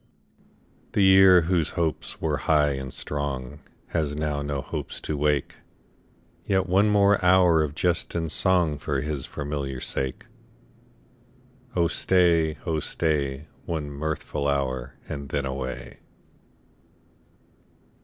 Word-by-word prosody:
The 100 - +3
year, 95 -1 +7
whose 85 -1 0
hopes 80 -3 -2
were - - 0
high 75 -2 +4
and 65 -1 -5
strong, 70 -1 -4 0.3
Has 75 -3 -1
now 75 -1 -2
no 70 -1 -3
hopes 65 - -5
to 75 - -3
wake; 75 -1 0 0.9
Yet 95 -1 +1
one 95 +3 +3
hour - - +2
more 95 -4 +4
of 75 -1 -4
jest 85 0 -1
and 80 -2 -1
song 85 -6 +2
For 70 -2 -2
his 75 -2 -3
familiar 70 -2 -4
sake. 65 0 -3 1.5
Oh 85 -2 +3
stay, 85 -3 +2
oh 80 -3 0
stay, 75 -3 -1 0.2
One 75 -4 -3
mirthful 75 0 -3
hour, 65 -3 -2
and 70 -2 -6
then 70 -2 -1
away. 65 -2 -5
75 Hz, 120 wpm, -25 LUFS, 70-85 Hz, 1.5 s, year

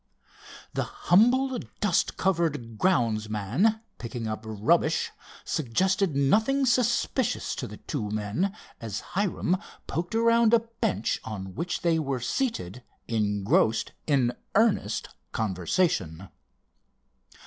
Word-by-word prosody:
The - - 0
humble, 250 +7 +3 0.2
dust 200 -5 +1
covered 155 - 0
grounds 115 - +2
man 130 - +1 0.2
picking 115 -1 -5
up 110 0 -3
rubbish, 150 +10 +1 0.3
suggested 185 - +1
nothing 220 - +3
suspicious 240 -1 +1
to - - -4
the - - -9
two 115 -9 -4
men, 105 - -1 0.3
as 110 -3 -4
Hiram 190 -1 +1 0.3
poked 175 +6 -3
around 230 0 +5
a 230 - +3 0.2
bench 105 +4 0
on 95 -4 -6
which 175 - -3
they 165 -2 +2
were 135 -4 -1
seated 125 - -2 0.3
engrossed 105 0 +1 0.2
in 130 -5 +2 0.2
earnest 220 0 +2 0.2
conversation. 95 - 0
150 Hz, 105 wpm, -27 LUFS, -, 0.3 s, around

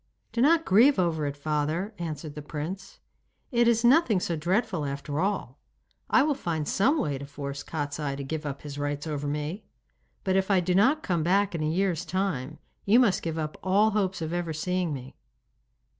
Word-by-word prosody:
'Do 235 - -1
not 325 +4 +4
grieve 240 +9 +5
over 160 -4 +1
it, 140 0 -5
father,' 155 +7 -1
answered 155 -3 -5
the 150 - -7
prince. 165 +6 -6 0.5
'It 240 -2 +3
is 235 0 +3
nothing 240 - +5
so 175 -1 -2
dreadful 175 +1 0
after 140 +1 -3
all! 185 -9 -2 0.5
I - - +5
will 300 0 +2
find 165 - -3
some 270 +11 +2
way 145 - -1
to 140 - -7
force 140 0 -6
Kostiei 145 -2 -3
to 140 - -5
give 155 +3 -4
up 140 -2 -5
his 145 -1 -7
rights 145 +1 -2
over 145 -2 -3
me. 150 +8 -3 0.6
But 190 -1 +1
if 190 +1 +1
I 195 -2 +4
do 180 +1 0
not 265 +12 +3
come 175 -4 0
back 195 +4 +2
in 165 - -2
a 155 - 0
year's 180 0 0
time, 160 -6 -2 0.3
you 220 +5 +5
must 210 -8 +3
give 165 -1 -3
up 155 -1 -4
all 205 +3 +3
hopes 190 -4 -1
of 160 +1 -3
ever 175 -2 -2
seeing 180 +2 -1
me. 130 -2 -7
170 Hz, 195 wpm, -27 LUFS, 150-195 Hz, 0.6 s, grieve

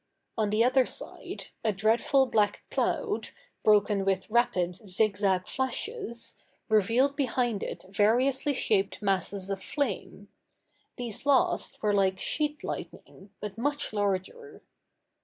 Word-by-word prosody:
On 215 -2 +1
the 215 +2 +3
other 255 +1 +4
side, - - -7
a 220 - +2
dreadful 225 +7 +3
black 210 -4 +1
cloud, 430 -4 -1 0.3
broken 205 -1 +4
with 195 +1 -1
rapid, 190 -7 +2
zigzag 195 -2 +1
flashes, 260 - -3 0.3
revealed 230 +7 +3
behind 245 -6 0
it - - -5
variously 250 +8 +2
shaped 200 -5 +1
masses 195 0 0
of 195 -1 -3
flame: 205 -7 -3 0.7
these 245 +2 -6
last 275 -5 +2
were 210 -1 +2
like 190 -1 +2
sheet 300 0 -1
lightning, 195 +2 -7
but 210 +1 -6
much 285 -1 -1
larger. 205 - -2
215 Hz, 120 wpm, -28 LUFS, 200-260 Hz, 0.7 s, other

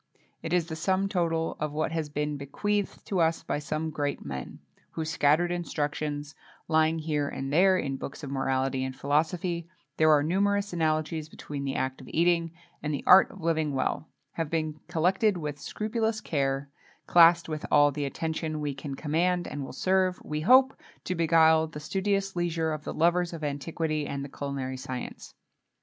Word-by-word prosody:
It 160 - -5
is 175 -2 +2
the 160 - -6
sum 190 +4 +1
total 165 -4 0
of 150 -1 -2
what 155 +1 -1
has 160 -2 -2
been 150 0 -2
bequeathed 200 +9 -2
to 190 - -1
us 165 0 +2
by - - -2
some 155 +2 -3
great 145 - -3
men, 65 -2 -6 0.3
whose 160 -1 -4
scattered 165 +2 +3
instructions, 150 -3 -3 0.3
lying 160 0 +3
here 150 -2 -1
and 135 +1 -4
there 185 +3 +5
in 135 -6 -2
books 140 +3 -7
of 140 - -5
morality 135 -1 0
and 130 0 -4
philosophy 165 +4 -1 0.3
there 155 0 +5
are 150 -2 +5
numerous 200 +4 +1
analogies 155 -1 -1
between 145 -3 -6
the 135 - -2
act 130 0 -2
of 130 - -12
eating 170 0 +2 0.3
and 150 - -2
the 145 - -3
art 190 - +8
of 200 - -12
living 160 -3 0
well 135 +3 -1 0.2
have 165 -3 -3
been 155 -2 -2
collected 185 +4 +2
with 150 -3 -5
scrupulous 220 - -2
care, 140 -7 -1 0.4
classed 170 0 +6
with 155 -1 -4
all 145 0 +5
the 145 0 -3
attention 160 +2 -3
we 145 -1 -2
can 140 0 -6
command, 175 +5 0
and 145 - -5
will - - -7
serve, 185 -1 +1
we 150 0 -3
hope, 260 - +6 0.3
to 185 - -2
beguile 160 -1 +4
the 155 -1 -8
studious 195 +4 -1
leisure 165 -2 0
of 150 -1 -5
the - - -4
lovers 175 +1 +2
of 165 -2 -7
antiquity 150 +1 -2
and 140 0 -4
the - - -9
culinary 135 -2 -4
science. 130 -1 -7
160 Hz, 180 wpm, -28 LUFS, 145-175 Hz, 0.4 s, art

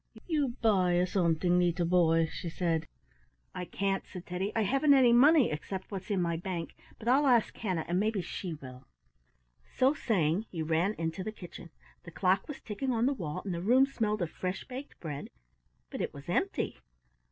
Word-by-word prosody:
"You 290 -7 0
buy 180 -5 +3
something, 175 -1 +2
leetle 175 0 +1
boy?" 165 -2 +4
she 165 +1 -6
said. 165 -2 -1 0.7
"I 180 - -4
can't," 195 +1 -1
said 180 -1 -9
Teddy. 185 +3 -3
"I 225 - +2
haven't 275 +7 +4
any 250 -3 +6
money 280 +2 +6
except 185 +7 -5
what's 195 0 -6
in 200 -3 +1
my 170 -2 0
bank, 175 -1 -4 0.2
but 225 - -10
I'll 275 +4 +4
ask 240 -4 +3
Hannah 185 -7 -2
and 175 +1 +1
maybe 215 0 0
she 175 0 -5
will." 130 -3 -12 0.8
So 260 - +2
saying 195 - 0
he 165 -3 -4
ran 165 +6 +1
into 165 +2 -3
the 215 - -4
kitchen. 175 -4 -11 0.3
The - - -11
clock 185 +3 +1
was 295 - -7
ticking 255 +5 -3
on 235 -1 +1
the 275 - +2
wall, 155 - -5
and 190 - -2
the 170 - -3
room 250 +8 +5
smelled 215 -7 -1
of 165 - -4
fresh 185 0 -4
baked 265 +3 -9
bread, 150 -4 -6 0.6
but - - -4
it - - -3
was - - -11
empty. - - -1
185 Hz, 185 wpm, -30 LUFS, 170-230 Hz, 0.8 s, any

